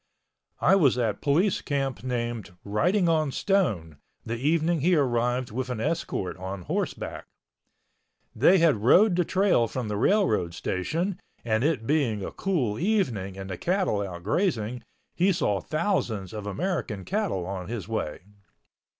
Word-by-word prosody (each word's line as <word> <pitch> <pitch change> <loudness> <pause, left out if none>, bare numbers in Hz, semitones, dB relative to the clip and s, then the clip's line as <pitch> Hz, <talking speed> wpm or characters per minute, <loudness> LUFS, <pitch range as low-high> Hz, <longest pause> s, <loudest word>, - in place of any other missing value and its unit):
I 195 - +5
was 140 -10 +4
at 110 -4 -1
Police 175 +8 +2
Camp 135 -4 -2
named 120 -6 -3
Writing 175 - +2
on 155 -3 +2
Stone 110 - 0 0.3
the 115 - -2
evening 160 +5 +1
he 175 +4 +4
arrived 125 -3 +1
with 130 +3 -3
an 125 -3 -3
escort 115 - -2
on 95 0 -6
horseback. - - -3 1.1
They 150 - +5
had 165 -8 +4
rode 175 - +5
the 180 - +3
trail 185 - +2
from 120 -1 -4
the 105 - -2
railroad 105 - +2
station 165 - -2 0.3
and 110 0 +1
it 150 -7 0
being 120 -9 +1
a - - -5
cool 135 - -1
evening 125 - 0
and 95 0 -6
the 95 -2 -6
cattle 180 - 0
out 90 -3 -6
grazing, 120 - 0 0.3
he 185 +3 +3
saw 105 - 0
thousands 125 - -1
of 105 -1 -6
American 125 - -3
cattle 195 - -1
on 95 -1 -5
his 115 -2 -5
way. 110 -9 -3
125 Hz, 150 wpm, -26 LUFS, 105-175 Hz, 1.1 s, I